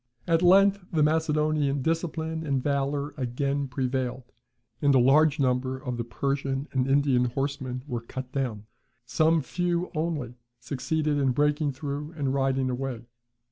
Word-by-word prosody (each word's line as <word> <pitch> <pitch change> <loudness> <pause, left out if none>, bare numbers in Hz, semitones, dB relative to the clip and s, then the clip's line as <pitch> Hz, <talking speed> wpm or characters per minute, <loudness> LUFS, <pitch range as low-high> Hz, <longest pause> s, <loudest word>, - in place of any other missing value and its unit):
At 165 -1 +2
length 195 +2 +5
the 155 -3 +2
Macedonian, 150 -2 +1
discipline 160 0 -2
and 135 -4 -1
valour 140 0 -1
again 140 +2 -1
prevailed, 130 -1 -2 0.6
and 140 -1 +4
a - - +6
large 150 +4 +4
number 130 0 +1
of 125 -2 -5
the 120 - -2
Persian 135 +3 -2
and 130 -1 0
Indian 135 -2 +3
horsemen 130 0 -3
were 120 -5 -4
cut 130 +2 -7
down; 120 -7 -3 0.4
some 155 +6 +2
few 175 +3 -1
only 155 -6 -2 0.3
succeeded 145 +4 -1
in 135 -2 +2
breaking 150 +1 +1
through 145 +2 -5
and 140 -4 -1
riding 135 -1 +1
away. 125 -2 -4
140 Hz, 140 wpm, -27 LUFS, 130-155 Hz, 0.6 s, a